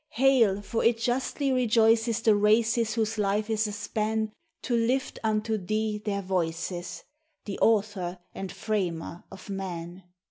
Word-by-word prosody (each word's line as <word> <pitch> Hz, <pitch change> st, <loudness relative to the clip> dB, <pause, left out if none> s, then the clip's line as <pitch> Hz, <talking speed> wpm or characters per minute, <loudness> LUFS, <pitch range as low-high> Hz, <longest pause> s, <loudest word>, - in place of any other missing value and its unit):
Hail! 230 Hz, -6 st, +4 dB
for 225 Hz, +3 st, -2 dB
it 230 Hz, 0 st, +4 dB
justly 255 Hz, +4 st, -1 dB
rejoices 230 Hz, -2 st, +3 dB
the 220 Hz, -2 st, +5 dB
races 220 Hz, +2 st, +3 dB
whose 220 Hz, -1 st, -1 dB
life 210 Hz, +2 st, 0 dB
is 220 Hz, 0 st, +1 dB
a -, -, -4 dB
span 215 Hz, +1 st, -2 dB, 0.3 s
To 240 Hz, -, 0 dB
lift 250 Hz, +4 st, 0 dB
unto 220 Hz, 0 st, 0 dB
thee 215 Hz, +2 st, -2 dB
their 200 Hz, -2 st, -2 dB
voices 175 Hz, -1 st, -3 dB, 0.2 s
— 315 Hz, 0 st, -48 dB
the 200 Hz, -, -5 dB
Author 200 Hz, -5 st, +1 dB, 0.2 s
and 195 Hz, -1 st, -5 dB
Franier 175 Hz, -5 st, -3 dB
of 195 Hz, +1 st, -10 dB
man. 180 Hz, -2 st, -5 dB
215 Hz, 145 wpm, -27 LUFS, 195-230 Hz, 0.3 s, the